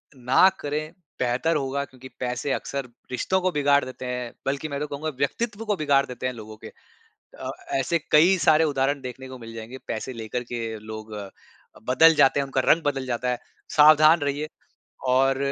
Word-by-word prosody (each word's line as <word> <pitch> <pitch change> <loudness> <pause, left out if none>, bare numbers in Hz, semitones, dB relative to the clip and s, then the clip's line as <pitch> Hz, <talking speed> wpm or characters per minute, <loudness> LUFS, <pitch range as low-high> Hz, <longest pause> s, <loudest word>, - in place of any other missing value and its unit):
ना 125 +8 +5
करें, 150 +2 -3 0.3
बेहतर 130 +6 +1
होगा 140 -1 -1
क्योंकि 130 -1 -13
पैसे 125 +2 -2
अक्सर 140 -2 -4 0.2
रिश्तों 185 +9 0
को 185 0 +1
बिगाड़ 145 -2 +3
देते 130 0 -8
हैं 125 -1 -4
बल्कि 140 +3 -1
मैं 140 -1 -3
तो 150 - -3
कहूँगा 145 +2 -4
व्यक्तित्व 215 - -2
को 210 - +1
बिगाड़ 140 -5 +2
देते 125 0 -7
हैं 125 - -3
लोगों 110 -1 -10
के। - - -5 0.7
अ, - - -4 0.3
ऐसे 170 +5 +1
कई 170 +5 +6
सारे 155 +1 +6
उदाहरण 140 +1 0
देखने 130 +1 -8
को 130 - -9
मिल 115 -1 -10
जाएँगे 115 +3 -8
पैसे 115 +3 -4
लेकर 115 +1 -4
के 120 - -2 0.2
लोग 110 0 -9 0.8
बदल 160 +6 +6
जाते 140 -1 +4
हैं, - - 0
उनका 135 -1 -1
रंग 165 +5 +5
बदल 135 -3 -1
जाता 125 0 -1
है। 125 - -1 0.3
सावधान 155 +2 +7
रहिए 145 +1 -2 0.6
और 135 +1 +3
135 Hz, 180 wpm, -25 LUFS, 125-150 Hz, 0.8 s, सावधान